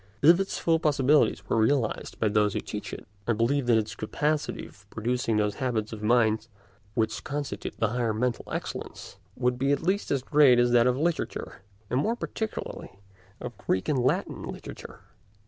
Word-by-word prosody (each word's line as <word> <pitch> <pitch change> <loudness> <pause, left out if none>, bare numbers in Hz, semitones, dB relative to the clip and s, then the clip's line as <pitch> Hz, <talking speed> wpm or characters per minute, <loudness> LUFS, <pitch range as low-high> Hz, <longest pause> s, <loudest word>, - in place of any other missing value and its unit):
If 170 +4 +7
its 195 - -2
full 165 -1 +2
possibilities 150 -2 +3
were - - +1
realised 115 +1 0
by 110 - +2
those 105 0 +2
who - - +1
teach 105 -1 -6
it, - - -8 0.2
I 120 - +3
believe 120 +4 +1
that 115 -2 +5
its 110 -1 -1
capacity 150 +7 -1
of - - -17
producing 115 0 -1
those 105 -1 +1
habits 115 -4 -1
of 105 - -7
mind 110 0 +2 0.5
which 110 -2 0
constitute 145 -2 -4
the 110 - +1
highest 115 -2 0
mental 125 0 -1
excellence - - -6 0.2
would 125 0 0
be 135 +2 +2
at 145 - 0
least 190 +4 0
as 135 -3 0
great 140 -3 +6
as 120 0 +4
that 120 0 +5
of 125 0 +2
literature, 165 +3 -2 0.3
and 125 - +2
more 225 +11 +1
particularly 220 - -5 0.4
of - - -6
Greek 95 - -1
and 145 -4 +2
Latin 125 - 0
literature. - - -8
125 Hz, 180 wpm, -27 LUFS, 110-145 Hz, 0.5 s, If